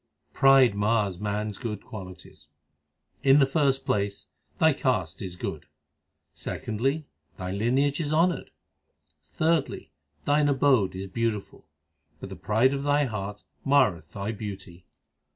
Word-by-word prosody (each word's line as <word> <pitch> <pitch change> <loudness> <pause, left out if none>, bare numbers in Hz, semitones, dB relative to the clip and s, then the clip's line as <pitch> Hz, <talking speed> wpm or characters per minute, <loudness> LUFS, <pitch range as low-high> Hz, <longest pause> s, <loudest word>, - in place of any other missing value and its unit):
Pride 135 -4 +6
mars 100 -3 0
man 105 +1 -2
s 100 - -8
good 110 -5 -5
qualities: 95 -6 -11 0.7
In 135 0 +6
the 140 - +6
first 135 -1 +1
place, 100 -1 -1 0.3
thy - - +4
caste - - -1
is 90 -2 -5
good; - - -5 0.7
Secondly, 135 +8 -2 0.3
thy 90 -1 -4
lineage 130 - +1
is 150 -2 -2
honoured; 170 +3 +1 0.9
Thirdly, 155 - 0 0.3
thine 145 0 +3
abode 130 -9 +3
is 95 +1 -5
beautiful; 105 -2 -3 0.5
But - - -8
the - - -7
pride 115 +6 +2
of 140 - -2
thy 145 +1 +2
heart 105 -5 -5 0.2
marreth 100 - +2
thy 100 +2 -4
beauty. 95 -5 -8
115 Hz, 130 wpm, -26 LUFS, 100-140 Hz, 0.9 s, Pride